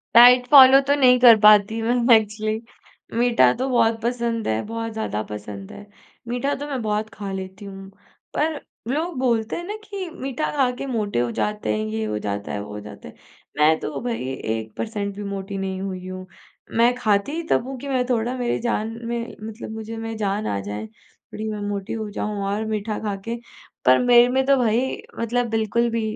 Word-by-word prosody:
Diet 245 +1 +8
follow 270 -1 +10
तो 285 - +4
नहीं 250 -3 +5
कर 240 -2 +9
पाती 210 +1 +5
मैं 240 +1 +4
एक्चुअली। 215 +1 -3 0.6
मीठा 235 - +4
तो 260 - 0
बहुत 230 -2 +2
पसंद 235 -1 -1
है, 110 0 0
बहुत 225 0 -4
ज़्यादा 220 - -3
पसंद 105 -2 -8
है। 205 - -11 0.4
मीठा 245 +4 -1
तो 290 +2 -6
मैं 265 -4 -3
बहुत 215 0 -1
खा 200 -2 -6
लेती 190 +1 -7
हूँ 195 -1 -9 0.4
पर 305 0 0 0.3
लोग 310 +3 -2
बोलते 235 -4 0
हैं 345 - -5
ना 410 +4 -5
कि 395 -4 -6
मीठा 270 -1 -3
खा 265 -3 +3
के 275 - -5
मोटे 215 - -1
हो 120 -1 0
जाते 210 - -1
हैं, 110 - -2
ये 110 0 -3
हो 105 0 -2
जाता 100 -1 -4
है, - - -3
वो 105 - -10
हो 105 - -6
जाता 105 0 -11
है, - - -13 0.4
मैं 155 +1 +4
तो - - -4
भई 230 - -3
1% 130 - -4
भी 205 - -6
मोटी 200 0 -5
नहीं 190 -1 -3
हुई 185 -1 -5
हूँ। 185 0 -7 0.5
मैं 235 +2 +5
खाती 215 +1 +1
ही 335 +2 -3
तब - - +2
हूँ 270 - -6
कि 280 - -8
मैं 255 -2 0
थोड़ा 240 +1 0
मेरी 245 -1 -1
जान 225 -2 -1 0.2
में 235 0 -4
मतलब 220 +1 -7
मुझे 220 0 -6
में 225 0 -5
जान 205 0 -1
आ 100 - -1
जाए 105 +2 -5 0.5
थोड़ी 220 +1 -4
मैं 210 - -4
मोटी 200 -1 -4
हो 220 -2 -4
जाऊँ 205 -1 -3
और 200 +2 -1
मीठा 215 0 -2
खा 210 -2 -3
के। 230 +1 -2 0.5
पर 130 +1 +7
मेरे 245 -1 +6
में 265 +1 +1
तो 275 0 +5
भई 235 -2 +2 0.4
मतलब 240 +1 0
बिल्कुल 225 +2 +1
भी 230 0 -1
220 Hz, 200 wpm, -23 LUFS, 195-245 Hz, 0.6 s, follow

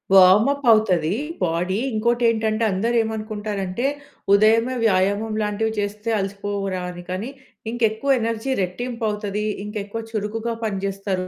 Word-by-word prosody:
Warm 190 +4 +7
up 285 0 -4
అవుతదీ 185 -5 +3 0.3
body. 180 +3 0 0.2
ఇంకోటేంటంటే 230 -1 +1
అందరూ 225 +6 0
ఏమనుకుంటారంటే, 215 -1 -3 0.5
ఉదయమే 225 +4 +4
వ్యాయామం 205 +2 +2
లాంటివి 215 +1 0
చేస్తే 210 +2 -3
అలసిపోవురా 195 -1 -3
అని? 175 0 -8
కాని 190 +7 -3 0.4
ఇంకెక్కువ 235 +3 +1
ఎనర్జీ 230 +3 -2
రెట్టింపు 230 +6 -4
అవుతది. 210 0 -3 0.2
ఇంక 210 +1 -7
ఎక్కువ 225 +3 -5
చురుకుగా 220 +2 -2
పనిజేస్తారు 195 -2 -2
210 Hz, 115 wpm, -22 LUFS, 195-225 Hz, 0.5 s, Warm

